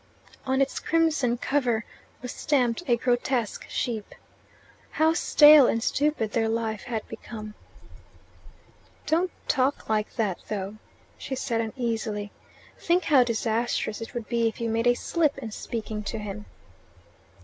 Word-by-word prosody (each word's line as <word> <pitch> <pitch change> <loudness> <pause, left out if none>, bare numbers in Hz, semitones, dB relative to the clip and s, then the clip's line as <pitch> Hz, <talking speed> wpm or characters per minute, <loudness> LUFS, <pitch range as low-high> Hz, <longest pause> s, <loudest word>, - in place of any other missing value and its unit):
On 265 +1 +3
its 275 - -4
crimson 315 -7 +1
cover 245 -4 0 0.4
was 250 - -4
stamped 250 -4 +1
a 240 -2 +3
grotesque 245 -2 -1
sheep. 220 -4 -3 0.7
How 315 +1 +2
stale 300 -4 +7
and 230 - 0
stupid 290 -7 0
their 225 0 +1
life 225 -2 -2
had 225 -3 -4
become! 215 -1 -8 1.5
"Don't 340 +4 +1 0.2
talk 270 -2 0
like 215 -1 0
that, 210 -6 -1
though," 205 0 -4 0.4
she 265 - -4
said 235 -3 -1
uneasily. 220 -3 -3 0.5
"Think 345 +1 +2
how 285 -6 +5
disastrous 230 -1 -1
it 225 - -8
would 235 -2 -4
be 235 -1 +1
if 225 - -4
you 230 -1 -1
made 230 +2 +1
a 245 - +5
slip 305 +1 0
in 235 -5 -6
speaking 215 -1 -5
to 225 - -3
him." 200 - -7
235 Hz, 140 wpm, -26 LUFS, 220-270 Hz, 1.5 s, stale